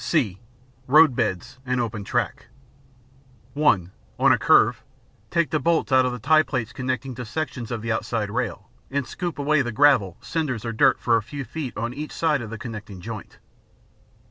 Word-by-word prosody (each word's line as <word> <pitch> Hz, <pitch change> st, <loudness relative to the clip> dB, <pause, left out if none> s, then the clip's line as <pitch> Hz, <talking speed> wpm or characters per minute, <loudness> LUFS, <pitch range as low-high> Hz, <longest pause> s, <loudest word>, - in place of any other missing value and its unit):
(c) 110 Hz, -, 0 dB, 0.5 s
Road 150 Hz, 0 st, +6 dB
beds 105 Hz, +1 st, -2 dB
and 125 Hz, -1 st, -1 dB
Open 110 Hz, -3 st, -3 dB
Track -, -, -2 dB, 1.1 s
(1) 105 Hz, -, +2 dB, 0.3 s
On -, -, +5 dB
a -, -, +5 dB
curve, -, -, +4 dB, 0.5 s
take 170 Hz, -2 st, +1 dB
the 155 Hz, -, +1 dB
bolts 165 Hz, 0 st, +1 dB
out 130 Hz, -1 st, +5 dB
of -, -, -1 dB
the 125 Hz, -, -4 dB
tie 155 Hz, +7 st, +4 dB
plates 125 Hz, -7 st, -3 dB
connecting 130 Hz, 0 st, -3 dB
to 125 Hz, +1 st, -6 dB
sections 130 Hz, -2 st, -4 dB
of 115 Hz, -2 st, -4 dB
the 115 Hz, -, -1 dB
outside 110 Hz, -1 st, -2 dB
rail, 115 Hz, -3 st, -3 dB, 0.2 s
and 140 Hz, -1 st, -1 dB
scoop 175 Hz, -1 st, -5 dB
away 145 Hz, +1 st, +2 dB
the 120 Hz, -2 st, -2 dB
gravel, 115 Hz, -8 st, +4 dB
cinders, 130 Hz, -9 st, -3 dB
or 115 Hz, -, -2 dB
dirt 110 Hz, -, +4 dB
for 115 Hz, -1 st, +3 dB
a -, -, -1 dB
few 140 Hz, +5 st, -7 dB
feet 145 Hz, -5 st, -6 dB
on 115 Hz, +2 st, -2 dB
each 150 Hz, +3 st, -6 dB
side 155 Hz, -4 st, +1 dB
of 110 Hz, -, -6 dB
the 115 Hz, -, -6 dB
connecting 105 Hz, -5 st, -8 dB
joint. 110 Hz, +2 st, -8 dB
125 Hz, 185 wpm, -24 LUFS, 110-145 Hz, 1.1 s, Road